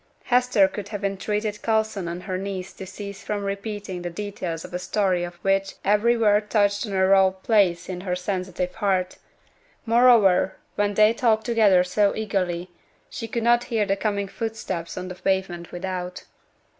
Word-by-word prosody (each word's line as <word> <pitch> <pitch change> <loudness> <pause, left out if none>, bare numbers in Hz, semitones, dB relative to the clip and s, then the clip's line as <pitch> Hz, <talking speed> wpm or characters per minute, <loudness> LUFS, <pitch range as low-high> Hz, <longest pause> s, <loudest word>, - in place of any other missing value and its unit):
Hester 245 -5 +3
could 200 +1 -7
have 205 -1 -4
entreated 210 +2 -2
Coulson 220 -4 0
on 170 +1 -5
her 185 0 -4
knees 190 -1 -5
to 190 - -9
cease 200 +1 -8
from 205 -1 -3
repeating 200 -2 -4
the 175 - -4
details 180 -3 -5
of - - -12
a 180 - -2
story 185 -2 0
of 175 0 -6
which 195 0 +1
every 210 +4 +3
word 210 -1 +2
touched 205 0 +2
on 200 - -5
a 190 0 +3
raw 190 0 +5
place 190 -2 +1
in 180 -1 -5
her 180 -1 -2
sensitive 180 -1 -3
heart; 190 -4 -1 0.7
moreover, 225 -6 +5 0.2
when 205 0 0
they 215 +2 +5
talked 220 -2 +1
together 215 -6 +4
so 200 +3 +1
eagerly, 185 -5 -2 0.4
she 225 - -5
could 230 +1 -3
not 240 +1 +3
hear 220 -3 0
the 195 0 +1
coming 200 -1 -1
footsteps 195 -6 -5
on 185 0 -4
the 180 - -6
pavement 185 -2 -2
without. 180 0 -5
195 Hz, 170 wpm, -24 LUFS, 185-215 Hz, 0.7 s, raw